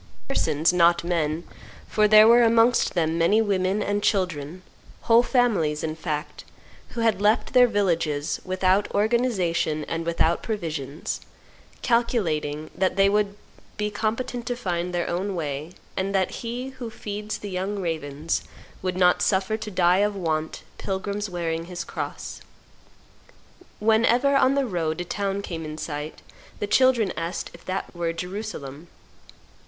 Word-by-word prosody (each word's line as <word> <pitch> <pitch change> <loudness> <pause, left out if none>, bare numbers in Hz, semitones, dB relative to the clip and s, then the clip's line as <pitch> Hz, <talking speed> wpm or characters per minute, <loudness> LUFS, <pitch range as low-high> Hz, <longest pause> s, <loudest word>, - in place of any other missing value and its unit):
Persons, 155 +4 +1
not 170 -1 +4
men, 165 -2 -1 0.4
for 215 -1 +3
there 215 +1 +8
were 235 +1 +7
amongst 230 +1 +4
them 165 -1 +1
many 185 +6 +4
women 200 -1 +1
and 205 0 -1
children, 180 -4 -1 0.4
whole 230 0 +5
families, 210 - +1
in 155 -1 -2
fact, 155 -2 -4 0.5
who 235 - -2
had 220 -4 +2
left 215 +3 +2
their 250 -1 +7
villages, 165 -9 0
without 185 +2 +1
organization 200 -9 +1
and 165 0 -3
without 170 0 +1
provisions, 155 - -4 0.6
calculating 165 - 0
that 185 0 0
they 195 0 +4
would 205 0 +1 0.4
be 210 0 -1
competent 230 +3 -2
to 245 - -1
find 180 -6 -2
their 175 -1 -1
own 190 +3 -2
way, 150 -1 -4 0.2
and 195 +1 -1
that 190 -1 +1
He 245 +3 -4
who 260 -3 -7
feeds 210 -1 -5
the 205 - -7
young 190 +3 -2
ravens 160 -4 -2 0.4
would 185 -1 -2
not 180 -1 +4
suffer 195 +2 +1
to 220 -1 -6
die 180 -2 +3
of 205 0 +1
want 160 -4 -2 0.2
pilgrims 200 +2 -3
wearing 165 -2 -2
His 175 -1 -5
cross. - - -6 1.4
Whenever, 230 +5 +3
on 275 0 +4
their 280 -1 +2
road, 165 -7 -2
a 175 - -3
town 195 +2 -2
came 165 -4 -5
in 155 0 -6
sight, 150 0 -6 0.3
the - - -2
children 235 -1 +3
asked 165 +3 -4
if 170 - -14
that 190 +1 -4
were 170 -1 -1
Jerusalem. 175 -5 -6
185 Hz, 145 wpm, -25 LUFS, 165-215 Hz, 1.4 s, there